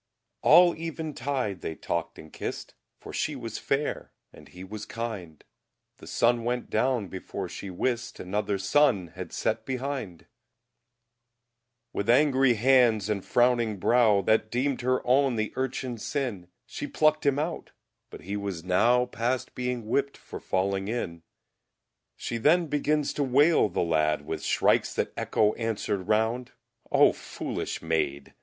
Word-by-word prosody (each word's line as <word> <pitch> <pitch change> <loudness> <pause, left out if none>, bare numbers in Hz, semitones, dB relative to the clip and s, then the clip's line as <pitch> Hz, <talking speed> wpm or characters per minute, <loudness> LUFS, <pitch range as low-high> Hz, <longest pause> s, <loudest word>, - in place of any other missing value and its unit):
All 175 0 +7
Even 160 -1 -5
Tide 130 -10 -2
they 80 - -4
Talkde 85 0 -3
and 80 - -13
Kist, - - -6 0.2
For - - -11
She 150 - -1
was 115 -4 -6
Fayre 140 +2 -2 0.2
and - - -15
He 90 +1 -11
was 105 +2 -7
Kinde; 105 -9 -6 0.5
The - - -13
Sunne 120 0 +2
went 125 +1 -2
down 120 -2 +1
before 95 +1 -6
She 95 - -7
wist 120 +5 -2
Another 100 +2 -1
Sonne 100 - +2
had 90 0 -8
sett 110 0 -1
behinde! 130 - -4 1.7
With 100 +3 -2
angrie 135 -1 +4
Hands 120 -3 +4
and 105 -2 0
frownynge 120 -2 +2
Browe, 110 -1 +4
That 110 +2 +2
deemd 130 +3 -1
Her 130 +1 0
owne 130 0 +3
the 110 -1 -2
Urchine's 130 -3 -3
Sinne, 120 -11 -3 0.2
She 145 - -6
pluckt 155 0 +2
Him 140 -1 +2
out, 160 +3 -3 0.4
but - - -11
he 100 +3 -5
was 100 -5 -4
nowe 115 +7 +3
Past 125 +2 -2
being 125 -1 -3
Whipt 140 +6 -1
for - - -9
fallynge 95 +1 -1
in. 85 -8 -3 1.0
She 115 - -3
then 165 +8 +4
beginnes 150 0 0
to 145 - +2
wayle 140 -1 +4
the 85 - -1
Ladde 75 -3 +1
With - - -4
Shrikes - - +2
that - - -1
Echo 105 0 +1
answered 105 -4 -2
round 110 +3 0 0.4
O - - +6
foolish - - -5
Mayd! 75 -4 -1
115 Hz, 150 wpm, -27 LUFS, 100-130 Hz, 1.7 s, All